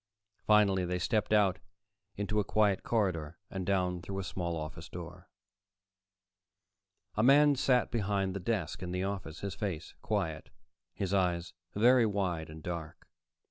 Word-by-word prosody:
Finally 100 -3 +5
they 90 0 -1
stepped 105 +5 0
out 100 -5 +4 0.6
into 105 +1 -1
a - - +2
quiet 100 -1 +2
corridor 85 -8 -1
and 95 -2 -4
down 90 -2 +1
through 95 +2 -6
a 95 - -2
small 85 -1 -3
office 80 +1 -7
door. 90 +1 -9 1.9
A 105 - +2
man 145 +4 +6
sat 130 -2 +2
behind 100 -4 0
the - - -2
desk 90 -5 -2
in 90 -1 -4
the 90 +1 -1
office, 95 -5 -4
his 100 -2 -3
face 90 -4 -4
quiet, 85 -8 -2 0.5
his 95 -1 -2
eyes 90 -2 +1 0.2
very 120 +2 +5
wide 90 -6 -1
and 80 0 -10
dark. 85 -3 -6
95 Hz, 145 wpm, -32 LUFS, 85-105 Hz, 1.9 s, man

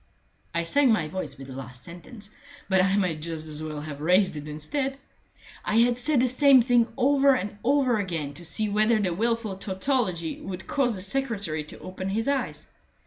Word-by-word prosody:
I 170 0 -1
sank 275 +10 +4
my 180 -8 +1
voice 185 +1 -5
with 135 - -9
the 130 - -9
last 125 -1 -9
sentence, 200 +5 -10 0.4
but 190 -1 +4
I 195 +1 +2
might 175 -6 0
just 160 -1 -5
as 155 -1 -5
well 155 -1 -5
have 145 -1 -7
raised 180 +3 +3
it 150 0 -6
instead. 265 - -3 0.7
I 210 - -1
had 240 +1 +4
said 270 0 +2
the 255 - +3
same 260 0 +5
thing 240 -1 +3
over 275 +1 +4
and 205 -4 -4
over 260 -3 +3
again 165 -7 -3
to 175 - -8
see 210 +6 0
whether 215 +2 +3
the 185 -4 0
wilful 225 0 -1
tautology 190 - -1
would 190 0 -6
cause 250 -5 +1
the 185 - -5
secretary 200 - -2
to - - -10
open 185 +1 -5
his 225 +5 -1
eyes. 280 -1 -1
200 Hz, 195 wpm, -26 LUFS, 165-245 Hz, 0.7 s, same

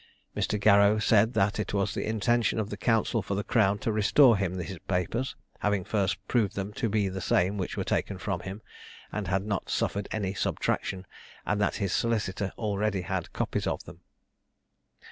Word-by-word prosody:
Mr. 105 - 0
Garrow 100 +1 +5
said, 110 +1 +3
that 100 0 +1
it 105 - -2
was 100 -1 0
the - - -2
intention 115 +2 +1
of 110 -1 -2
the - - -3
counsel 115 +2 +1
for 100 - -3
the 100 - -1
crown 100 -4 +2
to 110 - -2
restore 115 +4 +5
him 95 -2 -1
his 90 0 -5
papers, 100 +8 -1 0.2
having 105 -2 +1
first 95 -2 0
proved 105 -5 +1
them 100 +1 -4
to 115 0 -1
be 105 -1 +1
the 95 0 -4
same 90 +3 +2
which 95 -3 -3
were - - 0
taken - - -1
from - - -2
him, 95 +3 -7 0.5
and 105 -3 -3
had 95 +3 0
not 100 -3 -2
suffered 100 0 -1
any 100 -3 -2
subtraction; 95 -1 -1 0.4
and 105 0 0
that 100 - +1
his 100 -4 -1
solicitor 105 -4 0
already 105 -2 -1
had - - -3
copies - - -2
of - - -2
them. - - -12
100 Hz, 185 wpm, -28 LUFS, 95-110 Hz, 0.5 s, Garrow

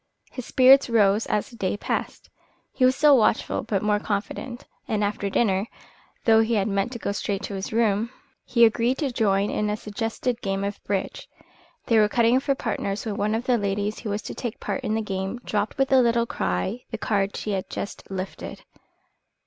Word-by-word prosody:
His 255 - -7
spirits 260 +1 +6
rose 210 -2 +3
as 210 - -1
the - - -12
day 195 -2 -1
passed. - - -4 0.4
He 260 - -1
was 255 0 +5
still 290 0 +6
watchful, 215 - +1
but 205 -3 -2
more 210 0 +2
confident; 220 +4 -4 0.2
and, 210 -1 0
after 205 0 -1
dinner, 195 -1 +1 0.6
though 225 -1 +6
he 225 +1 +1
had 200 -1 +1
meant 200 +2 0
to - - -4
go 205 - -3
straight 200 -1 -3
to - - -5
his 195 0 -4
room, 220 0 +1 0.3
he 235 -1 +5
agreed 235 +3 +2
to 280 -4 -1
join 205 -4 +1
in 210 0 -1
a 210 - -1
suggested 225 +3 -3
game 195 0 -2
of 200 0 -4
bridge. 195 -2 -3 0.6
They 225 -2 +4
were 210 -1 +4
cutting 235 +3 +3
for 275 0 0
partners 200 -4 -3
when 215 -2 -3
one 210 +1 0
of 230 - -2
the 245 -2 +2
ladies 205 +1 -2
who 220 - -5
was 205 0 -2
to - - -6
take 240 -4 -5
part 200 -2 -3
in 215 - -1
the 220 - -1
game 195 +2 -3
dropped 205 0 -1
with 270 0 +1
a 265 -1 +6
little 235 -1 +2
cry 95 - -2
the 225 - -4
card 200 -2 0
she 210 - -3
had 190 -2 -3
just 200 - -6
lifted. 190 0 -6
215 Hz, 205 wpm, -25 LUFS, 200-235 Hz, 0.6 s, spirits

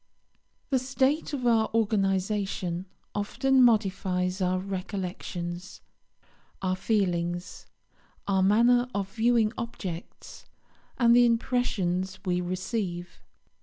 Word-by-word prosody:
The 265 - +3
state 270 +5 0
of 270 -4 -3
our 225 -2 +3
organisation 195 -4 0 0.3
often 260 +6 +2
modifies 190 -5 +2
our 185 0 +1
recollections, 185 -2 -5 0.8
our 185 -1 0
feelings, 180 -4 -1 0.6
our 195 -1 +2
manner 235 +5 +4
of 195 -1 -3
viewing 230 -1 +2
objects, 190 -7 -7 0.5
and 235 -1 +5
the 245 0 +6
impressions 190 -6 0
we 180 -1 +1
receive. 180 0 -4
195 Hz, 90 wpm, -27 LUFS, 185-235 Hz, 0.8 s, the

